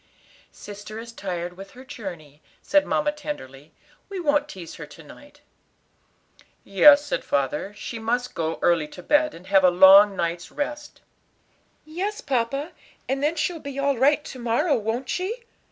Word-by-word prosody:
"Sister 205 +1 -10
is 230 +1 -8
tired 180 -5 -5
with 195 +1 -11
her 255 +1 -13
journey," 165 - -9 0.2
said 295 0 +2
mamma 295 0 +1
tenderly; 155 - -8 0.4
"we 390 -2 -5
won't 295 -3 +1
tease 180 - -9
her 150 - -8
to 160 +2 -14
night." 290 - -16 1.2
"Yes," 285 +9 +6
said - - -1
her - - -20
father, 140 +8 -1
"she 230 +2 -7
must 245 +3 -2
go 160 -1 -2
early 170 -3 +3
to 180 +4 -12
bed, 300 - +2
and 170 +2 -13
have 195 0 +3
a 180 - +7
long 195 +3 +7
night's 170 -1 -3
rest." 295 0 -5 0.8
"Yes, 385 +7 -4
papa, 275 - -2 0.4
and 270 +1 -1
then 300 +3 +1
she'll 325 +2 -2
be 280 -2 -8
all 280 0 +1
right 295 +3 +3
to 260 - -9
morrow, 240 +6 +1
won't 230 +3 -3
she? 425 - -3
235 Hz, 165 wpm, -24 LUFS, 180-295 Hz, 1.2 s, a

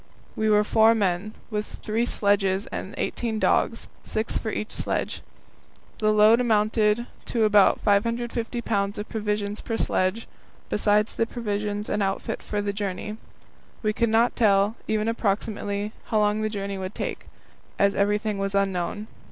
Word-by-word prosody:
We 220 0 +1
were 210 0 +5
four 220 +2 +5
men, 200 0 -1 0.2
with 210 0 -2 0.2
three 225 +3 0
sledges 200 -2 +1
and - - -5
eighteen 230 -2 -2
dogs, 230 +1 +1 0.2
six 220 +1 -2
for 220 - -1
each 215 0 -4
sledge. - - -2 0.8
The 215 0 +3
load 215 +3 +6
amounted 215 0 +2 0.2
to 230 -2 0
about 210 -2 +5
550 230 +3 0
pounds 200 -1 -1
of 210 - -5
provisions 210 -1 -2
per 225 - -3
sledge, 185 +2 0 0.4
besides 210 0 +2
the 230 - 0
provisions 210 -3 -3
and 210 - -1
outfit 195 -1 -2
for 205 -1 -3
the 200 0 -1
journey. 205 +1 -4 0.7
We 215 0 +1
could 235 +1 +1
not 230 +2 +3
tell, 205 -1 +3
even 215 0 0
approximately, 205 -1 -1
how 220 - 0
long 210 0 +2
the 215 - 0
journey 200 -2 -4
would 185 +1 -5
take, - - -4 0.5
as 200 0 +3
everything 205 +1 0
was 195 0 -2
unknown. 195 +1 0
210 Hz, 150 wpm, -25 LUFS, 200-220 Hz, 0.8 s, load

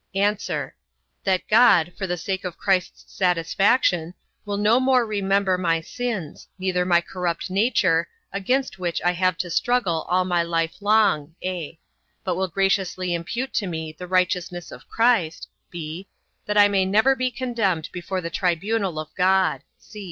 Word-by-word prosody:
A. 205 +2 +3 0.9
That 190 -2 +1
God, 210 -7 +5
for 190 - -4
the 180 0 -2
sake 190 +2 -3
of 180 -2 -5
Christ's 185 -2 -1
satisfaction, 180 0 +2 0.3
will 205 -1 -3
no 215 +4 +4
more 255 -2 +3
remember 195 -3 +1
my 165 -2 +1
sins, 195 -3 -5
neither 185 -1 0
my 175 -1 +4
corrupt 180 0 -4
nature, 185 -5 +2 0.3
against 250 +4 -1
which 175 -2 -2
I 175 - +4
have 185 0 0
to 180 -2 -4
struggle 195 -7 0
all 180 +1 +2
my 175 -2 +1
life 165 +1 -2
long; 200 -8 +2
(a) 175 -3 -4 0.5
but - - -1
will 190 0 -1
graciously 185 -1 0
impute 235 +10 -3
to 205 - 0
me 160 -2 -4
the 180 +3 -9
righteousness 180 -1 -1
of - - -13
Christ, 225 -9 +1 0.2
(b) 170 +3 -7 0.4
that 210 0 0
I 205 0 +8
may 200 -2 +2
never 220 +8 +3
be 255 -1 0
condemned 230 -10 -1
before 185 +1 -4
the 170 0 -5
tribunal 190 +1 -1
of 155 0 -6
God. 185 -6 +2
185 Hz, 155 wpm, -23 LUFS, 170-205 Hz, 0.9 s, I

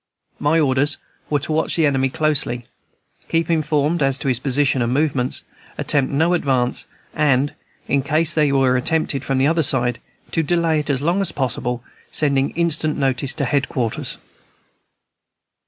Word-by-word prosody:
My 155 +3 +2
orders 145 0 +1 0.3
were 150 - +2
to 155 - -5
watch 160 +1 0
the 165 - +3
enemy 135 -2 +2
closely, 135 -5 0 0.6
keep 165 0 0
informed 155 0 +1
as 135 -1 +2
to - - -4
his 125 -2 +1
position 135 0 +1
and 120 0 0
movements, 135 -2 0 0.3
attempt 140 -2 +1
no 160 +5 +2
advance, 130 -6 0 0.3
and, 145 -2 +2 0.3
in 140 - +2
case 160 +4 +1
any 150 -3 +3
were 135 -2 +3
attempted 145 0 0
from 135 -2 -1
the 130 - +3
other 165 +3 +2
side, 125 -4 +1 0.3
to 165 - +1
delay 165 0 +1
it 150 - -5
as 140 -1 0
long 175 +5 +1
as 195 - -1
possible, 125 -2 -2 0.3
sending 140 -2 +1
instant 160 -2 +1
notice 135 -1 0
to 140 - -1
head 135 +2 0
quarters. 115 -4 -2
140 Hz, 160 wpm, -20 LUFS, 130-155 Hz, 0.6 s, the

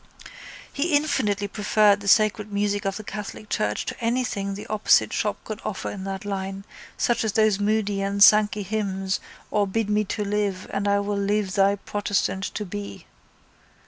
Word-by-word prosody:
He 295 +2 +1
infinitely 220 -9 +1
preferred 205 0 +3
the 200 - -8
sacred 215 0 +3
music 205 0 -1
of 195 0 -1
the 215 - -7
catholic 210 +1 -7
church 105 0 -1
to - - -6
anything 230 -5 -1
the 205 - -8
opposite 215 0 +3
shop - - -1
could 215 0 -6
offer 205 -3 -4
in 195 -1 -7
that 195 +1 -5
line 195 -1 -4 0.3
such 240 -1 +1
as 220 -2 -1
those 215 -3 +3
Moody 205 -1 0
and 200 +1 +3
Sankey 210 0 +5
hymns 195 -2 -2 0.3
or 205 -1 +2
Bid 210 +1 -1
me 210 0 +2
to 210 +2 -3
live 200 -2 -1
and 200 0 -1
I 200 0 +3
will 200 0 -2
live 200 -1 0
thy 195 +1 +3
protestant 200 -1 -2
to 210 - -3
be. 205 +2 -7
205 Hz, 175 wpm, -24 LUFS, 195-215 Hz, 0.3 s, Sankey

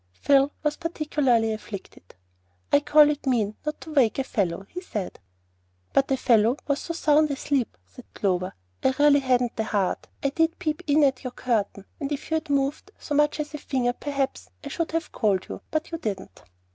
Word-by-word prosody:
Phil 275 - +3
was 300 0 0
particularly 295 -9 +1
afflicted. 200 - -9 0.6
"I 285 - +7
call 295 0 +6
it 290 -1 -5
mean 220 -5 +1
not 300 0 -3
to 315 - -8
wake 255 -7 +3
a 270 - +1
fellow," 190 -6 -1
he 360 - -7
said. 210 - -5 0.7
"But 275 - +3
a 270 - +2
fellow 235 +1 +3
was 280 -1 0
so 335 - -5
sound 305 -2 +3
asleep," 275 -2 -1
said 250 - -15
Clover, 185 -2 -1 0.3
"I 260 - +3
really 290 0 +6
hadn't 250 -3 +1
the 220 - +1
heart. 200 -4 -1 0.2
I 275 - +3
did 325 +3 +1
peep 310 -1 -2
in 295 +1 +4
at 270 -2 +2
your 255 - -3
curtain, 220 -5 -2
and 285 -1 -3
if 290 +2 -4
you - - +3
had 315 -1 -6
moved 280 +6 0
so 295 - -5
much 295 +1 +2
as 300 0 -4
a 300 - -5
finger, 250 -3 0
perhaps 275 0 -3
I 280 - -6
should 335 +3 -2
have 330 +1 -2
called 200 -5 +1
you; - - -7
but 310 +2 -2
you 330 - -4
didn't." 200 - -5
275 Hz, 195 wpm, -25 LUFS, 230-300 Hz, 0.7 s, I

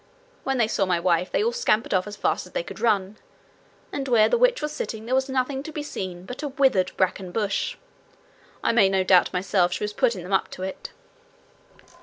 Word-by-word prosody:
When 270 0 -1
they 230 -3 +3
saw 195 -3 0
my 175 -2 +1
wife 175 +1 +1
they - - +1
all 465 - +2
scampered 445 - +1
off 185 +1 +1
as 205 - -6
fast - - -1
as - - -19
they - - -1
could - - -9
run, 205 -3 +1 0.7
and 275 -1 -3
where 230 -4 +4
the - - +3
witch - - +4
was 300 - -3
sitting 220 -6 -5
there 245 - -2
was 265 +1 +1
nothing 265 +1 -1
to 315 - -8
be 300 -1 -4
seen 185 -10 -6
but 250 +6 -7
a 300 - -2
withered 265 -10 +2
bracken 185 0 0
bush. 210 - -1 0.9
I - - +3
made 200 -5 +4
no 190 -1 +3
doubt 185 -1 +4
myself 180 -1 +1
she - - -3
was 210 0 -3
putting 235 -8 0
them 185 +3 -5
up 190 - +2
to 185 - -7
it.' 190 - -6
215 Hz, 220 wpm, -24 LUFS, 185-270 Hz, 0.9 s, where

